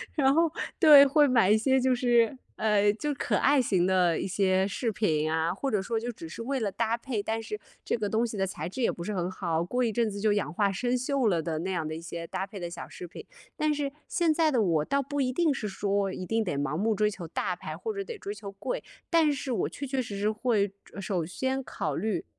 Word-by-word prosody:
然 275 -2 +4
后， 330 0 +3 0.3
对， 295 -5 +9
会 290 +1 +4
买 230 -7 +4
一 215 - +7
些 265 +4 +3
就 255 0 +2
是， 240 -1 +3 0.2
呃， 210 -1 +3
就 295 +6 -2
可 - - -1
爱 280 -1 +4
型 185 -7 +2
的 180 -3 +3
一 - - -2
些 190 0 +2
饰 225 +3 -2
品 155 -7 0
啊， 160 +1 +1
或 270 +8 -2
者 210 -5 +1
说 225 +4 -2
就 240 +2 -4
只 165 -7 -9
是 170 - -8
为 265 +2 -1
了 205 -3 -1
搭 230 +2 0
配， 235 -4 -3
但 225 +2 -2
是 425 - -6 0.2
这 - - 0
个 210 -3 -2
东 225 +2 +1
西 225 - -5
的 195 -1 0
材 160 -4 -5
质 195 +9 -5
也 235 - +3
不 170 - -7
是 210 - -3
很 180 -2 -1
好， 170 -3 -1
过 245 +8 -1
一 230 - +1
阵 230 0 +1
子 200 - -6
就 210 0 +2
氧 205 -8 -1
化 200 +3 +1
生 245 +6 -1
锈 260 -1 0
了 175 -5 +2
的 160 -1 -2
那 185 - -3
样 165 -4 -2
的 155 - -4
一 165 - -7
些 170 0 -6
搭 190 +3 -4
配 200 0 -9
的 175 - -4
小 170 0 -8
饰 180 - -8
品。 180 - -11 0.3
但 305 0 +1
是 285 -2 -1 0.2
现 340 -5 +2
在 315 0 +3
的 250 - +2
我 165 -5 +2
倒 280 - 0
不 285 +1 -2
一 255 - +1
定 310 +3 +2
是 215 - -4
说， 200 0 -1
一 185 - -5
定 225 +4 0
得 175 -8 -2
盲 145 +1 -1
目 215 +6 +1
追 210 +1 +2
求 180 -5 -7
大 - - -2
牌， - - -7
或 445 - -4
者 395 -1 -3
得 460 +3 -7
追 205 - -5
求 205 -1 -8
贵， 200 +6 -4 0.3
但 325 -3 +4
是 270 -1 -3
我 235 - 0
确 280 - -6
确 265 -1 -1
实 210 -5 -6
实 210 +2 +1
会 215 -3 +1 0.3
首 190 -3 -1
先 260 +10 -2
考 150 - -3
虑 195 -1 -2
215 Hz, 280 characters per minute, -28 LUFS, 185-260 Hz, 0.3 s, 对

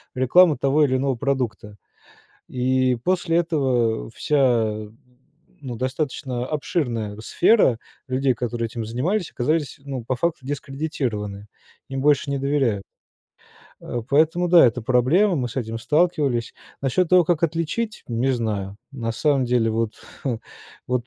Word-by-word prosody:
рекламу 150 +6 +5
того 145 +2 +3
или 130 -2 +1
иного 135 0 0
продукта. 120 -5 -3 0.7
И 130 0 +1
после 175 -1 +1
этого 130 -10 0
вся, 115 -6 +1 0.8
ну, 125 -3 -5
достаточно 130 0 -3
обширная 120 -9 -2
сфера 175 - +3 0.3
людей, 130 0 +1
которые 120 0 -3
этим 115 0 -5
занимались, 155 - -1
оказались, 145 +2 -1
ну, 135 -4 -5
по 130 - -1
факту 165 -1 -1
дискредитированы, 130 -8 -4 0.4
им 135 -1 -3
больше 145 -1 +3
не 140 - 0
доверяют. 135 -8 0 1.0
А 120 - -4
поэтому 160 +7 +2
да, 175 -1 +7
это 120 0 -1
проблема, 130 - +3
мы 125 -3 -1
с 120 - -11
этим 115 -2 -3
сталкивались. 150 -4 +1 0.3
Насчёт 140 +6 +1
того, 180 -1 +5
как 170 -1 0
отличить, 170 +7 -1
не 120 +3 0
знаю. 105 -5 -2 0.2
На 115 -4 -3
самом 140 +1 +1
деле 120 -2 +2
вот, 110 0 -1 0.9
вот 125 -1 -1
130 Hz, 130 wpm, -23 LUFS, 115-150 Hz, 1.0 s, да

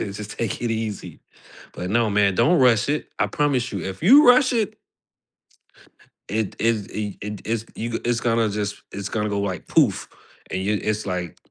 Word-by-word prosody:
Ju 100 - -3
just 105 -1 -8
take 115 -4 -2
it 120 - -1
easy.'" 110 -2 -4 0.5
But 90 - -5
no 115 0 +2
man, 100 -1 +3
don't 150 - +4
rush 120 -3 +4
it. 150 - -1
I - - +2
promise 135 -5 0
you, 100 -4 -4
if 95 0 -6
you 270 - +7
rush 255 +1 +6
it 215 -2 -1 1.5
it 110 -1 -2
it's 110 -3 0
y 105 -2 -4
it 105 0 -6
it's 110 0 -2
you 115 +1 -4
g 115 - -3
it's 120 -1 0
gonna 115 -2 +1
just 105 0 -4
it's 100 0 -5
gonna 105 -1 -2
go 100 0 -1
like 95 -4 -4
"Poof." - - +2 0.4
And 95 - -2
y 105 +1 +1
it's 110 0 -1
like, 90 -3 -4
110 Hz, 195 wpm, -23 LUFS, 100-120 Hz, 1.5 s, you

